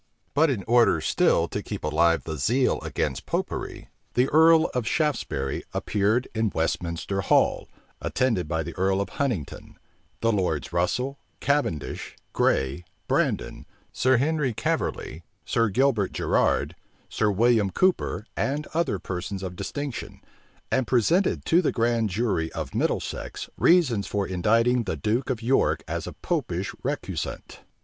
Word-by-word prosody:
But 155 +3 +4
in 115 -8 -1
order 120 +2 +4
still - - +2
to - - -3
keep - - -6
alive 80 +2 +2
the 80 - -4
zeal 125 - +2
against - - -3
Popery, - - -3 0.3
the 125 +2 +3
earl 160 +1 +6
of 125 -3 -1
Shaftesbury 130 - -1
appeared 105 +5 +1
in 110 -1 +1
Westminster 85 +3 -2
Hall, - - +2 0.3
attended 115 -11 0
by 80 0 -1
the - - -6
earl 95 +1 +2
of 100 -1 -2
Huntingdon, 120 - -3 0.4
the 115 - +3
lords 90 -7 -1
Russel, 125 +11 0 0.2
Cavendish, 140 - -1 0.2
Grey, 65 +6 +1 0.2
Brandon, - - -1 0.3
Sir 130 0 +3
Henry 140 -2 0
Caverly, 80 - -2 0.2
Sir 115 -2 +1
Gilbert 115 -3 +1
Gerrard, - - +1 0.3
Sir 105 - 0
William 110 0 +3
Cooper, 185 - +1
and 145 +3 -1
other 165 -10 0
persons 95 +2 -5
of 90 -1 -5
distinction, 135 +8 -5 0.5
and 130 -2 +1
presented 165 - +2
to 170 +2 +4
the 165 - +1
grand 115 -2 +1
jury 95 -5 -1
of - - -5
Middlesex - - -2
reasons 130 - +3
for 100 -1 -1
indicting 115 +6 +2
the 95 -5 -2
duke 110 - -1
of 120 -3 -2
York 130 +3 +2
as - - -3
a - - -6
Popish - - -2
recusant. - - -4
115 Hz, 140 wpm, -25 LUFS, 95-130 Hz, 0.5 s, earl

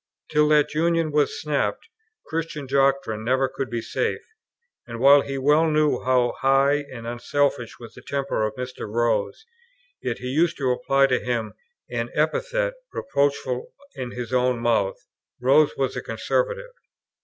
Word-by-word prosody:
Till 150 -1 +4
that 150 -1 +3
union 165 0 +1
was 145 -1 +1
snapped, 150 - -1 0.4
Christian 160 -2 -4
doctrine 135 -5 +1
never 130 +3 +2
could 135 0 -5
be 120 -1 -3
safe; - - -2 0.6
and, 115 -1 -7
while 140 +3 +7
he 135 0 -4
well 150 +4 +3
knew 150 -1 +2
how 125 -1 +2
high 140 +2 +3
and 115 -3 -8
unselfish 120 +1 -1
was 115 -2 -11
the 125 - -13
temper 140 -4 -2
of 110 0 -2
Mr. 125 -4 -6
Rose, 115 - 0 0.6
yet - - -2
he 125 - -5
used 165 +5 +1
to 130 -3 +1
apply 135 +2 +3
to 130 -2 +1
him 120 -3 -2 0.3
an - - -3
epithet, - - 0 0.2
reproachful 140 - -1 0.2
in 125 -1 -5
his 120 -1 -6
own 125 -1 +2
mouth; 115 -5 +1 0.4
Rose 140 +4 +4
was 135 -1 -1
a - - -3
"conservative." - - -2
135 Hz, 155 wpm, -24 LUFS, 125-150 Hz, 0.6 s, while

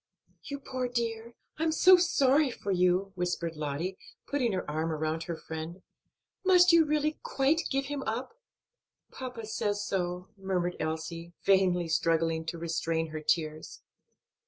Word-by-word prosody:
"You 280 - -4
poor 260 -2 -3
dear, 235 -1 -3 0.2
I - - 0
am 325 - +2
so 370 +4 +7
sorry 295 -5 +3
for 205 -4 -4
you!" 180 +1 +2
whispered 175 -2 -2
Lottie, 155 +5 -3 0.3
putting 260 -5 0
her 185 - -2
arm 155 +2 -1
about 155 +1 -2
her 170 -1 -4
friend. 160 +4 -7 0.6
"Must 360 -2 +6
you 330 -1 +7
really 305 0 0
quite 285 +5 +1
give 275 0 0
him 285 0 -4
up?" 240 - -3 0.8
"Papa 250 -4 -6
says 205 -1 -1
so," 180 0 -2
murmured 185 -3 -2
Elsie, 160 +2 -4
vainly 185 -3 +3
struggling 165 0 +1
to 170 - -4
restrain 165 -1 -1
her 155 0 -5
tears. 155 0 -2
185 Hz, 145 wpm, -30 LUFS, 165-260 Hz, 0.8 s, so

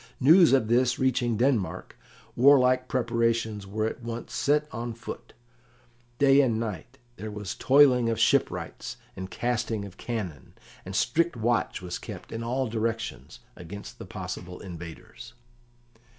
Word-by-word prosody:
News 165 +6 +7
of 130 -5 +3
this 125 +2 +2
reaching 120 -3 +1
Denmark, 120 -5 0 0.4
warlike 130 -1 +5
preparations 115 -4 0
were 110 +2 -2
at 110 - -4
once 115 0 -6
set 150 +1 +1
on 115 0 -5
foot; 115 - -9 0.8
day 140 0 +6
and 115 -5 +1
night 115 +3 -5 0.2
there 110 - -6
was 105 -2 -5
toiling 130 -4 +5
of 115 - -1
shipwrights - - 0 0.2
and 95 0 -6
casting 115 -3 -2
of 100 -1 -12
cannon, 100 - -5 0.3
and 95 +1 -6
strict 165 - +1
watch 115 -4 0
was 90 -1 -4
kept - - -9
in 115 - -4
all 130 +3 -1
directions 115 0 -4
against 100 +4 -9
the - - -7
possible 90 0 -7
invaders. 85 -3 -10
115 Hz, 135 wpm, -27 LUFS, 105-130 Hz, 0.8 s, News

